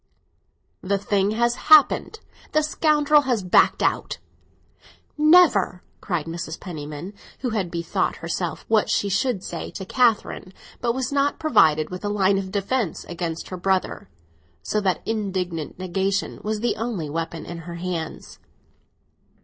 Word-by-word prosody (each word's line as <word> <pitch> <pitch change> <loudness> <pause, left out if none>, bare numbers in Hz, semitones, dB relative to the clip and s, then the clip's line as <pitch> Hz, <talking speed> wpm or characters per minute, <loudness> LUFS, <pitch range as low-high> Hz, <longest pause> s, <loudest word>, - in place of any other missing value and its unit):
"The 200 +1 0
thing 200 0 +1
has 235 0 +2 0.2
happened—the 310 +1 +3
scoundrel 300 -1 +3
has 245 -7 -1
backed 180 - +4
out!" - - 0 1.0
"Never!" 300 - +4 0.2
cried 175 -6 -2
Mrs. 165 -1 -6
Penniman, 155 +1 -7 0.3
who 250 -2 -1
had 200 -5 -1
bethought 170 -1 -1
herself 165 -1 -4
what 220 -2 +2
she 200 - +1
should 200 0 0
say - - -5
to 190 - -7
Catherine, 225 -5 +1 0.3
but 235 -1 0
was 260 0 -2
not 280 0 +1
provided 160 - +3
with 180 +2 -6
a 205 - -1
line 195 -1 +2
of 190 -1 -5
defence 205 0 -1
against 170 -1 -5
her 185 - -5
brother, 190 - -1 0.5
so 210 - -1
that 190 -2 0
indignant 185 -7 -3
negation 190 +2 -2
was 215 0 -3
the 240 - 0
only 215 -8 -3
weapon 165 +2 -4
in 170 -1 -7
her 170 +1 -8
hands. 170 -2 -5
195 Hz, 140 wpm, -23 LUFS, 175-235 Hz, 1.0 s, backed